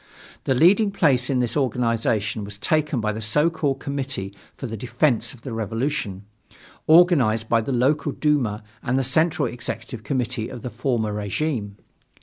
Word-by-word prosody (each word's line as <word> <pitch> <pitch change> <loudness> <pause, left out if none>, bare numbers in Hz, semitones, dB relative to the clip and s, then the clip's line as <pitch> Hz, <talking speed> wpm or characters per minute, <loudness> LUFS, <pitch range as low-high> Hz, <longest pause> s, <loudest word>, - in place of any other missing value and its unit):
The 135 - +2
leading 195 - +5
place 140 -10 +2
in 130 -2 +1
this 120 - -1
organization 115 -5 0
was 100 0 -7
taken 150 0 0
by 105 0 -1
the 110 - -5
so 150 +10 +2
called 145 -4 -1
Committee 135 -9 -4 0.2
for - - -6
the 115 -2 -5
Defence 120 +1 +1
of 120 - -15
the 130 - -6
Revolution, 115 -2 -3 0.6
organized 145 -10 +5
by 115 0 +3
the 125 - -4
local 135 +4 +1
Duma 125 -9 0 0.2
and 125 +2 0
the 135 - +1
Central 160 +6 +2
Executive 115 -1 -6
Committee 125 -4 -2
of 120 - -9
the 125 - -5
former 115 -3 -1
regime. 105 0 -3
125 Hz, 160 wpm, -23 LUFS, 110-145 Hz, 0.6 s, leading